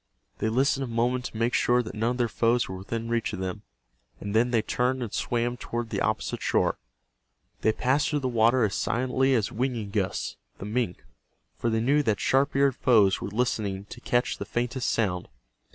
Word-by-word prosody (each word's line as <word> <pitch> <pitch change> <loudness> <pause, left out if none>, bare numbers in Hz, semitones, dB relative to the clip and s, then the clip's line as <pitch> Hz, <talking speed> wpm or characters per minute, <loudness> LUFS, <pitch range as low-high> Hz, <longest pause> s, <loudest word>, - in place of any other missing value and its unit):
They 110 - 0
listened 135 +4 +2
a - - -3
moment 120 +2 0
to - - -6
make 115 +2 +1
sure 125 0 +3
that 110 - -7
none 115 +2 0
of 125 - -2
their 120 -1 +2
foes 115 +2 +1
were 95 - -6
within 115 +4 -4
reach 115 -1 -1
of 100 - -4
them, 95 +2 -4 0.6
and 100 +1 -4
then 120 +2 +4
they 115 -3 +2
turned 125 +2 0
and 110 - -6
swam 120 0 -1
toward 120 -1 -4
the - - -1
opposite - - -1
shore. - - +1 0.8
They 110 - +3
passed 130 +7 +1
through 150 -2 0
the 130 - -1
water 120 +1 +3
as 100 -3 +1
silently 130 +2 +1
as 110 -4 0
Winingus, 110 -6 -2 0.2
the - - -7
mink, 105 -4 -2 0.5
for 120 - -1
they 110 0 +1
knew 140 +5 +3
that 110 -7 0
sharp 135 +2 +2
eared 140 -2 +3
foes 105 -7 +4
were - - -3
listening 105 -3 -1
to 120 - -9
catch 120 +1 0
the - - -4
faintest 120 +1 -1
sound. 90 -6 0
120 Hz, 200 wpm, -27 LUFS, 110-125 Hz, 0.8 s, then